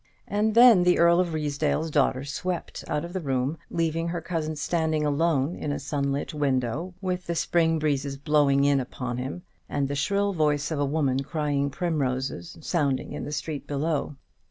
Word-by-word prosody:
And 215 +1 0
then 235 -5 +8
the 180 0 +4
Earl 170 +1 +5
of 180 -2 +1
Ruysdale's 155 +1 -1
daughter 135 -2 +2
swept 170 +5 -4
out 150 +2 -1
of 175 - -9
the 190 - -1
room, 135 +1 -1
leaving 165 0 -1
her 170 0 -2
cousin 160 -2 -3
standing 155 0 0
alone 150 0 +1
in 150 - -3
a - - -1
sunlit 140 +2 -2
window, 145 +4 -1
with 185 -1 -3
the 170 - -1
spring 165 -1 +2
breezes 140 -3 -1
blowing 140 -1 +3
in 140 -1 +4
upon 125 -1 -4
him, 135 +8 -5 0.3
and 140 -1 0
the 140 - -3
shrill 200 +8 +1
voice 150 -2 +1
of 155 - -1
a 145 - +2
woman 140 -2 +1
crying 145 0 -1
primroses 135 - -2
sounding 145 -5 0
in - - -5
the - - -5
street 150 -1 -4
below. 145 0 -1
150 Hz, 180 wpm, -26 LUFS, 140-170 Hz, 0.3 s, then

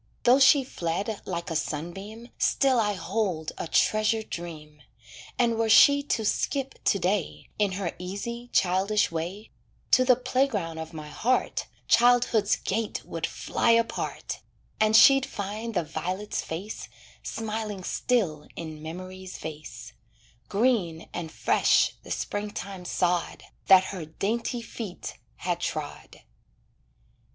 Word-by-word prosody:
Though 250 +3 +6
she 275 +1 +7
fled 200 -1 -3
like 170 0 -4
a - - -2
sunbeam, 195 +10 -4
Still 265 -3 +3
I 210 -2 +2
hold 185 -3 -2
a - - -3
treasured 215 +4 +2
dream, 150 -3 -7 0.6
And 235 -2 +2
were 225 -1 +1
she 285 +6 +7
to 230 -6 -1
skip 270 +5 -1
to - - +4
day, 190 -1 -1
In 205 -2 +2
her 185 -2 -3
easy, 235 +7 -5
childish 190 +3 +2
way, 175 +6 -5 0.4
To 255 - +6
the 255 -1 +5
playground 250 -10 -1
of 160 0 -6
my 155 -2 -8
heart, 235 +12 0 0.2
Childhood's 240 -3 +4
gate 215 +2 -3
would - - -3
fly - - -1
apart, 230 0 -1 0.4
And 215 0 +4
she'd 270 +2 +8
find 215 +1 -5
the 175 - +2
violet's 180 +6 -3
face, 185 +7 -6 0.3
Smiling 215 -3 -4
still 180 -11 0
in 155 -2 -7
memory's 185 +3 -8
vase; 150 -7 -8 0.6
Green 200 -7 +1
and 165 -2 -5
fresh - - +3
the - - -14
springtime 200 -2 -4
sod, 180 -1 0 0.2
That 190 -1 +8
her 175 -5 -5
dainty 230 +8 -2
feet 215 -5 -7 0.2
had 175 -1 -2
trod. 155 -4 -5
200 Hz, 125 wpm, -27 LUFS, 170-230 Hz, 0.6 s, she'd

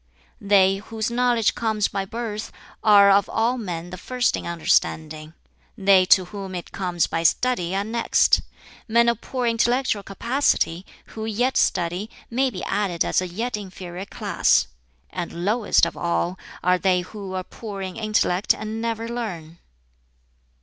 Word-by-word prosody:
"They 195 -1 +4
whose 220 +2 -4
knowledge 240 -2 +2
comes 220 -3 0
by 195 - -3
birth 220 0 -5 0.3
are 200 -2 +7
of 200 +1 +3
all 240 +3 0
men 175 -4 -5
the 185 - -7
first 250 +4 0
in - - -6
understanding; 155 -2 0 0.4
they 195 -2 +5
to 185 0 +5
whom 195 0 -7
it 175 - -7
comes 180 -3 0
by 165 - -2
study 180 0 +1
are 200 - 0
next; 230 +2 +2 0.5
men 235 +1 +4
of 235 -1 +1
poor 255 -2 -3
intellectual 235 -1 +1
capacity, 195 - 0 0.3
who 220 0 -5
yet 245 +4 0
study, 180 +4 0 0.2
may 260 +3 +2
be 185 -7 -7
added 195 -4 -1
as - - +1
a 185 - -3
yet 225 +8 -3
inferior 185 -2 -7
class; - - +2 0.5
and 175 -1 -5
lowest 215 +2 +3
of - - -5
all 170 +1 -1 0.2
are 180 0 +3
they 185 -1 +2
who 190 0 -8
are 185 - -2
poor 200 0 -8
in 185 -1 -6
intellect 215 -3 +1
and 220 +1 -5
never 230 0 -2
learn." 180 -9 -6
200 Hz, 155 wpm, -23 LUFS, 180-230 Hz, 0.5 s, are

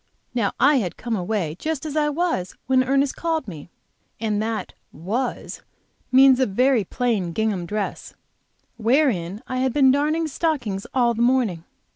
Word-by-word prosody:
Now, 230 -5 0
I 290 -1 +5
had 190 -9 -2
come 235 -2 -3
away 180 -4 -2
just 315 -2 -3
as 305 -1 -5
I 300 -1 +2
was, 295 - -2
when 260 0 +3
Ernest 275 +1 +1
called 325 -5 -2
me, 160 -4 -9 0.5
and 215 -2 -1
that 220 0 -3 0.2
"was" 215 - -4 0.5
means 265 0 +6
a 260 - +3
very 250 +3 +2
plain 200 -5 -1
gingham 205 -4 -1
dress 210 +1 -4 0.6
wherein 225 - +1
I 255 - -4
had 260 -1 0
been 270 -3 +5
darning 305 +4 +1
stockings 265 - -2
all 240 -2 +3
the 230 - -3
morning. 235 -9 +1
245 Hz, 155 wpm, -23 LUFS, 205-275 Hz, 0.6 s, means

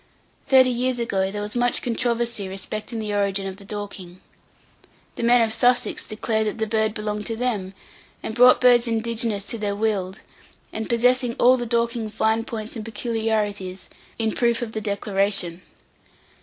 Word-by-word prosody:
Thirty 260 -1 +6
years 250 +1 0
ago, 195 -5 0
there 205 +1 -4
was 210 +2 -5
much 245 0 +1
controversy 235 -3 -1
respecting 210 +4 -6
the 215 -2 -3
origin 200 -1 0
of 190 -1 -5
the 200 - -12
Dorking. 195 -3 -7 1.0
The - - -5
men 235 0 +5
of 220 -1 0
Sussex 245 +2 +1
declared 220 0 -1
that 210 - -3
the 220 - 0
bird 220 0 0
belonged 210 -1 -3
to 225 - -2
them, 215 -6 -2 0.5
and - - -4
brought 250 +2 +7
birds 245 -1 +5
indigenous 225 -2 -1
to 230 - -3
their 205 -1 -1
weald, 200 -3 -1 0.5
and 220 0 -4
possessing 245 +1 +2
all 250 +1 +5
the 240 -2 -3
Dorking 235 -1 0
fine 220 +1 0
points 225 -2 -6
and 220 - -5
peculiarities, 210 -4 -2 0.3
in 225 -1 0
proof 235 0 +1
of 225 - -5
the 220 - -4
declaration. 200 -3 -1
220 Hz, 165 wpm, -23 LUFS, 205-235 Hz, 1.0 s, brought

